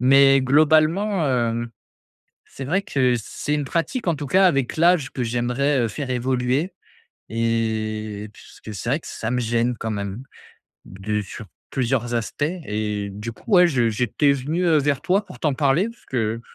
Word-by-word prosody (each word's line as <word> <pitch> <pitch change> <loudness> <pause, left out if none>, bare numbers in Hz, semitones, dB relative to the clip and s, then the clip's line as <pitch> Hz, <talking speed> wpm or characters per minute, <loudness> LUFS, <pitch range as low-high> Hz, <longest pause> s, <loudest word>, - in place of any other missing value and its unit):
mais 135 +1 +6
globalement, 155 +7 +3
hem, 120 -2 0 0.7
c'est 135 - -9
vrai 190 +6 +1
que 130 -8 +1
c'est 145 +6 -3
une 150 -1 -1
pratique 170 - -2
en 170 - +3
tout 145 0 -5
cas 190 +6 +4
avec 135 -7 +1
l'âge 165 -3 +3
que 130 - -3
j'aimerais, 125 +4 0
heu, 115 - +1
faire 130 +5 -5
évoluer 130 +6 0 0.6
et 110 -2 -2
puisque 110 0 -12
c'est 105 +4 -4
vrai 140 +5 +1
que - - -13
ça 110 +2 -4
me 125 - 0
gêne 120 +1 0
quand 110 - -3
même, 100 +3 -4 0.6
de 105 +3 -3
sur 105 +3 -9 0.3
plusieurs 120 -2 -1
aspects. 115 +5 -2 0.2
Et 105 -1 -3
du 105 +4 -6
coup, - - -20
ouais, 180 -1 +7
je 125 -8 +1
j'étais 125 +6 +2
venu, 150 +6 -1
heu, 160 -2 +4
vers 145 -1 0
toi 195 +3 +1
pour 180 - -12
t'en 150 -3 +1
parler, 150 - +2
parce 230 - -19
que 115 -3 -1
130 Hz, 175 wpm, -22 LUFS, 115-150 Hz, 0.7 s, ouais